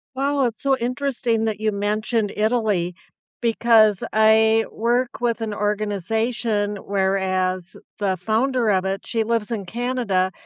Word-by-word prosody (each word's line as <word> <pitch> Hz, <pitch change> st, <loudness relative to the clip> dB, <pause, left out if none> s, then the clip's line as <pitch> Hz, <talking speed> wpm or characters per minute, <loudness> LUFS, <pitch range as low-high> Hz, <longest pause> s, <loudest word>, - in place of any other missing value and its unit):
Wow, 275 Hz, 0 st, +1 dB
it's 225 Hz, -2 st, -3 dB
so 270 Hz, -1 st, +2 dB
interesting 245 Hz, -2 st, -1 dB
that 215 Hz, -1 st, -2 dB
you 215 Hz, 0 st, 0 dB
mentioned 210 Hz, +1 st, -1 dB
Italy 210 Hz, -5 st, 0 dB, 0.5 s
because 225 Hz, -3 st, +4 dB
I 220 Hz, +1 st, +4 dB
work 240 Hz, +2 st, -1 dB
with 235 Hz, -1 st, 0 dB
an 215 Hz, -2 st, -3 dB
organization 210 Hz, +1 st, -1 dB
whereas 190 Hz, -2 st, -1 dB, 0.2 s
the 195 Hz, -2 st, 0 dB
founder 230 Hz, +5 st, 0 dB
of 190 Hz, -1 st, +2 dB
it, 195 Hz, +1 st, -2 dB
she 225 Hz, -1 st, 0 dB
lives 230 Hz, 0 st, -1 dB
in 210 Hz, -5 st, -3 dB
Canada, 225 Hz, -4 st, -1 dB
220 Hz, 130 wpm, -22 LUFS, 200-235 Hz, 0.5 s, because